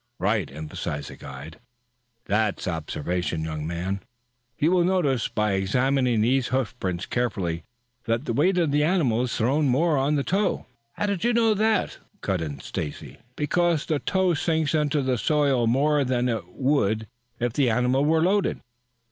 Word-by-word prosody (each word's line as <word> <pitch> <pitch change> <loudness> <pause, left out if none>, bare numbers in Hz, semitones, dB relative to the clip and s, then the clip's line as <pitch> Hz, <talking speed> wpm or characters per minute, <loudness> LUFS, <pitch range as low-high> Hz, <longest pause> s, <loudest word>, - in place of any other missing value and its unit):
"Right," 100 -3 0
emphasized 75 -1 -5
the - - -10
guide. 70 +6 -10 0.7
"That's 105 -1 0
observation, 85 0 -2
young 80 -1 -4
men. 90 +4 -3 0.6
You 155 +4 +2
will 180 -1 +4
notice, 170 -9 +1
by 105 -1 0
examining 125 +5 +1
these 125 +3 +2
hoofprints 115 -8 -2
carefully, 95 -9 -2 0.4
that 115 +4 -1
the 115 - -1
weight 180 +9 +2
of 165 -5 +2
the 145 +1 +3
animal 150 -9 +2
is 125 -2 -2
thrown 140 +6 +2
more 150 +3 +2
on 140 +3 +1
the 140 - +1
toe 200 +7 0 0.2
" 115 0 -47
"How - - -2
do 200 -3 -1
you 240 +1 +2
know 225 -2 +4
that?" 215 -1 +1 0.2
cut 95 -4 -1
in 75 -4 -5
Stacy. 75 -2 -6 0.2
"Because 165 +1 +1
the 155 -2 0
toe 190 +1 +1
sinks 160 0 0
into 150 -2 +1
the 130 -3 0
soil 140 -5 +2
more 145 +4 +3
than 125 -1 0
it 110 -7 -2
would 110 -1 0 0.3
if 120 -1 -1
the 135 -2 +2
animals 125 +5 +2
were 160 +1 +3
loaded. 195 +2 +1
125 Hz, 165 wpm, -25 LUFS, 100-155 Hz, 0.7 s, will